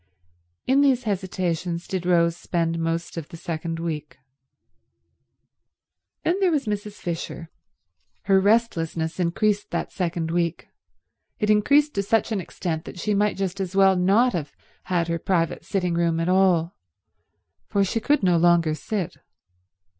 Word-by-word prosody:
In 270 +2 +4
these 265 -3 +3
hesitations 180 -4 -2
did 185 -2 -3
Rose 170 -2 +3
spend 165 -1 -1
most 165 +1 -2
of 160 -3 -6
the 165 - -9
second 165 0 -4
week. 155 -3 -5 2.1
Then 360 +4 +1
there 380 -2 +3
was 295 -5 0
Mrs. 210 -1 -3
Fisher. 170 -3 -6 0.7
Her 195 -1 +4
restlessness 175 -6 +1
increased 200 +4 0
that - - -3
second 170 -3 -2
week. 170 -1 -1 0.7
It 210 -1 +1
increased 285 +8 +4
to 200 - 0
such 225 +3 +1
an 205 -3 0
extent 165 -2 -4
that - - -9
she 210 +4 -1
might 205 +1 +1
just 195 0 -3
as 190 0 -4
well 195 -1 +5
not 200 +8 +3
have 150 -4 -4 0.3
had 175 -2 0
her 170 0 -1
private 165 -3 0
sitting 180 -3 -1
room 170 -1 +1
at 165 - -1
all, 180 -2 +3 0.9
for 200 - +1
she 195 +4 -1
could 285 +2 +1
no 180 -2 +4
longer 170 -2 +4
sit. 190 +3 -4
180 Hz, 145 wpm, -24 LUFS, 170-205 Hz, 2.1 s, well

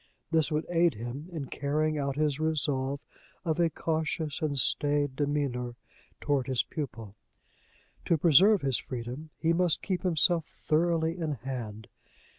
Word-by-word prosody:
This 160 -1 +2
would 155 +1 0
aid 170 -4 +3
him 120 +9 -6
in 155 -5 -4
carrying 150 +3 -1
out 140 -1 -1
his 150 -1 0
resolve 140 -3 0 0.4
of 160 0 0
a 170 -1 +4
cautious 160 -1 -2
and 150 -3 -1
staid 145 +1 +2
demeanor 140 -4 -1 0.4
toward 140 -4 0
his 130 -4 +1
pupil. 115 - -6 0.9
To 165 - +3
preserve 180 +5 +6
his 135 -3 +1
freedom, 125 +5 -6
he 165 +1 +2
must 175 -1 +2
keep 185 -3 -1
himself 170 -2 +2
thoroughly 165 +1 0
in 160 -3 -1
hand. 120 -5 -6
150 Hz, 140 wpm, -29 LUFS, 135-160 Hz, 0.9 s, preserve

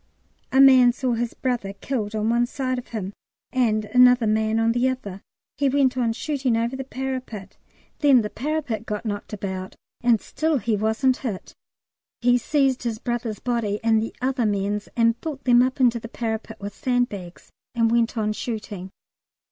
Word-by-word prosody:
A 265 - +3
man 260 -2 +8
saw 250 -1 -1
his 235 0 -2
brother 240 -7 -2
killed 215 -1 -3
on 215 0 0
one 240 +1 +2
side 255 -1 -2
of 245 - -11
him 205 -4 -5 0.4
and 220 -5 +1
another 250 +2 +5
man 220 +1 +1
on 225 0 +3
the 245 +2 +2
other. 205 -7 -5 0.4
He 280 -1 +3
went 265 -2 +2
on 240 -3 +1
shooting 260 -1 -1
over 235 +3 -1
the 270 - -4
parapet; 255 -6 -6 0.4
then 275 -5 +5
the 210 - -4
parapet 280 -5 -3
got 210 +2 -4
knocked 205 -2 -4
about, 190 -2 -5 0.3
and 235 -2 +4
still 315 +6 -1
he 230 -3 0
wasn't 220 +5 +1
hit. 215 -8 -5 0.7
He 245 0 +3
seized 270 0 +1
his 235 -3 -2
brother's 235 -2 -3
body 230 -4 -1
and 225 -1 +3
the 225 - -5
other 255 -3 +1
man's 205 0 -1
and 230 0 +2
built 290 -4 -5
them 245 -1 +5
up 260 +2 0
into 240 -2 +3
the 230 - -9
parapet 225 -2 -4
with 200 0 -6
sandbags, 210 -8 -3 0.2
and 230 -1 +2
went 235 0 +1
on 215 -1 0
shooting. 210 -5 -5
235 Hz, 175 wpm, -23 LUFS, 215-255 Hz, 0.7 s, man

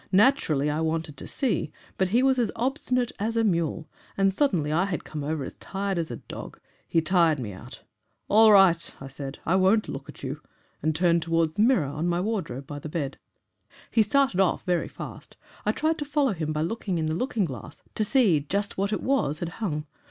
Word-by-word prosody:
Naturally 190 - +3
I 150 +2 0
wanted 160 -2 -2
to - - -7
see; 235 - -1 0.2
but 190 - +1
he 235 +7 +2
was 265 -1 +3
as 235 -4 +2
obstinate 250 -1 0
as 225 +3 -1
a 225 - +3
mule, 170 -5 0 0.3
and 195 0 +3
suddenly 185 - +1
I 170 +5 +2
had 190 -4 -3
come 150 -2 -6
over 150 0 -2
as - - -8
tired 195 -2 -3
as 165 - -2
a 120 - -4
dog - - -9 0.3
he 165 - +2
tired 170 -4 +3
me 110 -7 -5
out. 95 - -11 0.4
'All 220 +1 +7
right,' 190 -4 +5
I 135 - -8
said, 135 0 -7
'I 180 +4 +3
won't 195 +3 +3
look - - -7
at - - -11
you,' - - -4 0.4
and 155 -1 0
turned 170 0 +3
towards 165 -1 +1
the 205 - 0
mirror, 225 - +4
on 150 +5 -2
the 175 +1 0
wardrobe, 170 - -3
by 145 +1 -7
the 155 - -7
bed. 145 -4 -3 0.7
"He 225 - +4
started 220 -1 +2
off 190 -2 +2
very 175 -2 0
fast. - - -10 0.3
I - - +5
tried 315 +1 0
to 295 - -2
follow 285 -5 +1
him 155 -3 -3
by 155 0 -1
looking 190 0 -2
in 160 - 0
the 155 - -1
looking 225 - 0
glass, 125 -9 -8
to 215 - 0
see 210 - +4
just 195 +8 -2
what 200 +1 0
it 210 - -2
was 205 - +1
had 170 +1 -3
hung. 155 -8 -2
180 Hz, 215 wpm, -26 LUFS, 155-220 Hz, 0.7 s, All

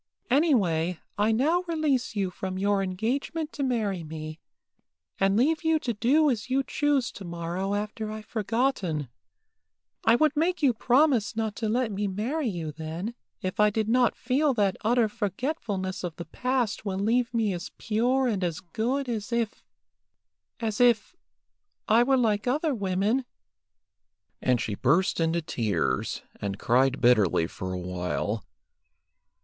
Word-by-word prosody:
"Any 295 +3 +5
way, 170 -4 0 0.2
I 210 +2 +2
now 300 +10 +2
release 300 -8 0
you 195 -3 0
from 185 +1 -5
your 200 +1 +2
engagement 255 - -2
to 290 - -5
marry 215 -9 0
me, 155 0 -7 0.8
and 195 +1 +3
leave 310 +7 +2
you 320 0 +3
to 250 -6 -2
do 265 +9 +3
as 240 +2 -3
you 270 +1 +2
choose 285 -3 +1
tomorrow 175 +2 -3
after 215 +1 -3
I've 215 0 -7
forgotten. 210 - -1 0.9
I 225 - +5
would 305 +3 +3
make 335 +2 0
you 265 -4 +5
promise 250 -1 +3
not 220 -2 -2
to 220 -2 -1
let 240 0 +1
me 205 +1 -1
marry 240 +10 -2
you 170 -7 -3
then, 160 +8 -5 0.3
if 185 +2 -3
I 210 0 +6
did 215 +1 -1
not 245 +1 +3
feel 270 +2 +1
that 200 -4 +2
utter 235 +1 +3
forgetfulness 205 - -3
of 170 -3 -4
the 170 - -7
past 250 -5 -1
will 195 -3 -2
leave 235 +5 +1
me 225 -4 +1
as 175 +1 -5
pure 245 +5 +1
and 205 -6 -1
as 170 -3 -1
good 245 +10 -2
as 225 -1 -3
if 235 -2 -1 1.0
as 220 -1 -1
if 240 - +3 0.7
I 225 +2 +5
were 265 +2 +3
like 215 -3 +1
other 295 +4 +1
women;" 200 +4 0 1.2
and 125 -2 +2
she 110 - -2
burst 160 - +2
into 165 0 +1
tears, 100 - -1 0.2
and 100 -1 -3
cried 130 +5 +2
bitterly 105 -9 +4
for 95 +2 -6
a 90 - -3
while. 90 +4 -3
215 Hz, 155 wpm, -27 LUFS, 180-255 Hz, 1.2 s, I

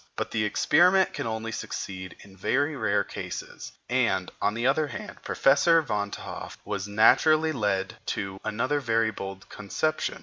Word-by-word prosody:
But - - -3
the 110 - 0
experiment 180 - +4
can - - -3
only 110 0 -3
succeed 95 -4 -6
in 95 -1 -15
very 145 +10 0
rare 105 -5 +1
cases; - - -7
and, - - +1
on 105 - +1
the 120 +1 -2
other 150 +3 +2
hand, 210 +8 -8
Professor 165 +5 +4
Van 105 -6 -2
t'Hoff - - -7
was 100 -1 -3
naturally 155 +10 +4
led 100 -7 -1
to 95 -3 -3
another 130 +7 0
very 115 -4 +1
bold 95 -1 -7
conception. 155 +10 -2
110 Hz, 155 wpm, -27 LUFS, 100-145 Hz, -, experiment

